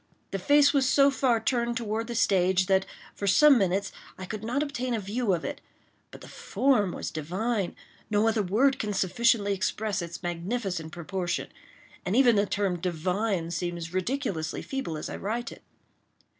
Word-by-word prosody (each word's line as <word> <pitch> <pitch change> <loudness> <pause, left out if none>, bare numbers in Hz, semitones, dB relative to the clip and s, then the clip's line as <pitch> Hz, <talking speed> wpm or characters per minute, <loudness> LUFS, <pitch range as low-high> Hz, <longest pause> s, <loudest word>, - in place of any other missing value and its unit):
The 195 - -2
face 285 +7 +5
was 270 -2 +3
so 280 +1 +5
far 255 -4 +2
turned 235 -1 0
toward 225 -1 -2
the 240 - -5
stage 185 -3 +3
that, 190 0 +2 0.3
for 200 - -4
some 280 +6 +6
minutes, 195 +1 0 0.3
I 185 - -6
could 215 +2 -6
not 250 +6 0
obtain 255 -4 -2
a - - -1
view 210 +2 -1
of 170 -3 -1
it—but - - -11
the - - -11
form 245 -9 +1
was - - -5
divine; 190 +6 -2 0.3
no 210 +1 +2
other 225 -1 +2
word 235 +9 +2
can 210 -1 -2
sufficiently 200 +2 +2
express 200 +1 -1
its 170 +1 -7
magnificent 175 -1 -3
proportion—and 180 +2 -5
even 245 -3 +5
the 200 0 +2
term 190 -4 -1
"divine" 180 +1 -1
seems 170 -1 -4
ridiculously 185 - -2
feeble 265 - -4
as 150 - -5
I - - -6
write 230 +4 -3
it. - - -12
205 Hz, 165 wpm, -27 LUFS, 180-240 Hz, 0.3 s, some